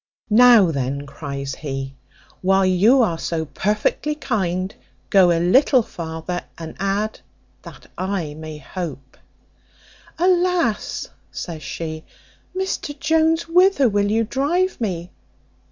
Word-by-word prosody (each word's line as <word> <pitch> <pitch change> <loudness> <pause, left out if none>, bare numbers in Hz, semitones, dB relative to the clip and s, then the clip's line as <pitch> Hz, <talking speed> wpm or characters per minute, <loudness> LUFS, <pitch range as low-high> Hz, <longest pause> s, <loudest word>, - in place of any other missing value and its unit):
"Now 225 -5 +7
then," 140 0 -3
cries 140 -1 -6
he, 135 -2 -5 0.5
"while 190 +1 +3
you 210 +8 +5
are 170 -7 -1
so 160 -2 -2
perfectly 210 - -1
kind, 190 - -2 0.4
go 190 -3 +6
a 170 - +2
little 250 - +4
farther, 165 0 -5
and 160 -1 -8
add 200 +2 -1 0.4
that - - -13
I 185 -5 -2
may 155 0 -8
hope." 145 -4 -7 1.0
"Alas!" 355 - +1 0.2
says 165 -3 -6
she, 155 +2 -5 0.5
"Mr 370 -6 -3
Jones, 320 +2 +2
whither 360 -5 +4
will 205 -2 +1
you 225 +2 +2
drive 295 - 0
me? 180 -4 -3
190 Hz, 115 wpm, -21 LUFS, 160-265 Hz, 1.0 s, Now